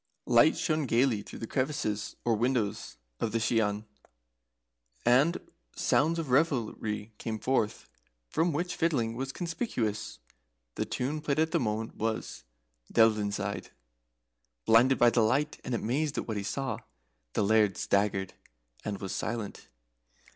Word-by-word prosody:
Lights 125 +6 +5
shone 155 -3 0
gaily 120 -2 +2
through - - -10
the - - -5
crevices 120 -6 -2
or 120 - +3
windows 115 - -1 0.2
of 110 - -1
the - - +2
Shian, 110 -2 +1 1.2
and 135 +8 +4 0.4
sounds 165 +3 +2
of 160 -6 -3
revelry 115 -7 0
came 110 -2 -3
forth, 115 -2 0 0.5
among 165 +2 +3
which 175 +4 -2
fiddling 125 -9 +1
was 135 +2 -3
conspicuous. 135 - -3 0.6
The - - -2
tune 145 +5 -2
played 145 -1 -1
at 160 +1 +2
that 170 - +2
moment 110 -2 -2
was 110 0 -3 0.5
"Delvyn 110 -2 +4
side." 100 0 -3 1.0
Blinded 125 +4 +5
by 120 -1 +6
the 115 - +3
light, 140 +7 +1
and 125 - -2
amazed 140 +7 -1
at - - -2
what 110 - -2
he - - -1
saw, 135 +7 -3 0.5
the - - +1
Laird 105 -2 +3
staggered, 100 -1 0 0.5
and 105 -2 -3
was 95 -1 -4
silent. 110 -2 -4
115 Hz, 140 wpm, -30 LUFS, 105-140 Hz, 1.2 s, by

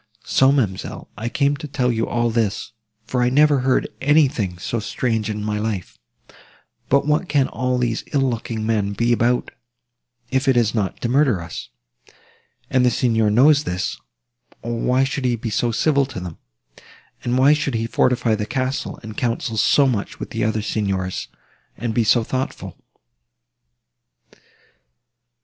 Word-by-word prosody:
"So, 135 +3 +4
ma'amselle, 110 -10 -2
I 115 +3 -4
came 140 +2 +1
to 150 - -7
tell 125 -3 0
you 115 -1 -1
all 120 -1 0
this, 110 -1 -1 0.3
for 125 +2 -1
I 125 - +3
never 145 +1 +4
heard 130 0 +1
anything 130 - +2
so 115 +6 -3
strange 110 0 -2
in 105 -1 -3
my 105 0 -2
life. 105 -4 -3 0.9
But 140 +1 +3
what 150 +4 +1
can 140 -3 +2 0.3
these 120 -2 -1
ill 140 - +2
looking 115 -2 -3
men 105 -3 0
be 115 +3 0
come - - +5
about, 120 +1 +1 0.8
if 130 +1 0
it 130 -2 +4
is 115 -3 +2
not 105 -5 -2
to - - 0
murder 130 -5 +3
us? 80 -8 -7 1.0
And 130 -1 +2
the 125 - +5
Signor 115 -3 +2
knows 140 +7 +5
this, 90 -10 -2 0.7
or 115 0 -3
why 125 +2 +2
should 135 0 -2
he 125 -1 +2
be 115 -1 -5
so 115 +3 +1
civil 140 +3 +2
to 120 -7 -7
them? 90 -2 -8 0.8
And 120 +1 0
why 135 +3 +6
should 145 -4 -1
he 115 0 0
fortify 120 0 +1
the 105 -1 -2
castle, 130 0 -2
and 110 -1 -8
counsel 115 -2 -2
so 140 +6 +4
much 115 -7 -2
with - - -6
the 115 -1 -2
other 110 0 0
Signors, 95 -4 -2 0.5
and 120 -2 -3
be 115 - +2
so 115 +2 +3
thoughtful?" 130 +3 -4
120 Hz, 165 wpm, -21 LUFS, 110-130 Hz, 1.0 s, why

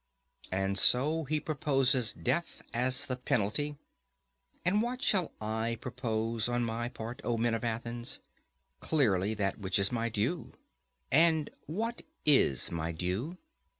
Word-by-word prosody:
And 95 +1 0
so 150 +6 +5
he 155 +2 +1
proposes 135 -6 +2
death 170 0 -1
as 125 +1 +1
the 130 - -2
penalty. 130 +3 0 0.9
And 200 +4 +3
what 250 +3 -2
shall 185 - +2
I 110 +2 -2
propose 115 -2 -2
on 120 0 +1
my 115 +1 -2
part, 115 0 -7
O 120 -1 0
men 115 +1 +1
of 115 - -2
Athens? 120 +1 -3 0.6
Clearly 110 - +2
that 100 -1 -1
which 95 -2 0
is 100 -1 +2
my 115 -1 0
due. 115 +10 -2 0.6
And 160 +1 +4 0.2
what 225 +9 -2 0.2
is 135 - +4
my 85 -1 -2
due? 95 - -3
120 Hz, 135 wpm, -31 LUFS, 110-150 Hz, 0.9 s, so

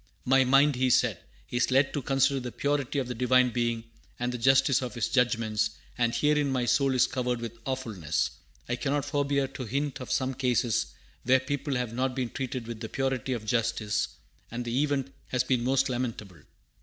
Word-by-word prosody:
"My 135 +1 +5
mind," 135 +1 +4
he 130 0 +2
said, - - +3 0.3
"is 120 - +1
led 135 +1 +3
to 145 - -1
consider 135 +1 +2
the 125 -1 -5
purity 145 0 -1
of 135 -3 0
the 125 - -3
Divine 125 +1 +3
Being, 115 -1 -1 0.3
and 125 0 -1
the 125 - -4
justice 135 +2 +4
of 125 -1 -5
His 115 - 0
judgments; 115 -4 +1 0.2
and 120 -1 +1
herein 150 -1 +2
my 130 -2 0
soul 135 +2 +2
is 125 - +5
covered 125 -2 -2
with 115 -1 -7
awfulness. 110 - -1 0.4
I 120 - -1
cannot 140 +3 -1
forbear 140 -1 0
to 135 -1 -6
hint 140 +3 -2
of 125 - -6
some 130 0 0
cases 120 -3 +1 0.4
where 130 +1 +4
people 140 +1 -3
have 125 -2 -2
not 130 +1 -1
been 125 -3 -2
treated 130 -3 -4
with 115 -1 -6
the 110 -1 -6
purity 135 -1 -1
of 115 -3 -5
justice, 110 -2 0 0.4
and 120 +1 -5
the 120 +3 0
event 140 -9 -1
has 125 -1 0
been 125 -3 +1
most 130 +1 +2
lamentable. 115 -8 -4
125 Hz, 195 wpm, -28 LUFS, 120-135 Hz, 0.4 s, My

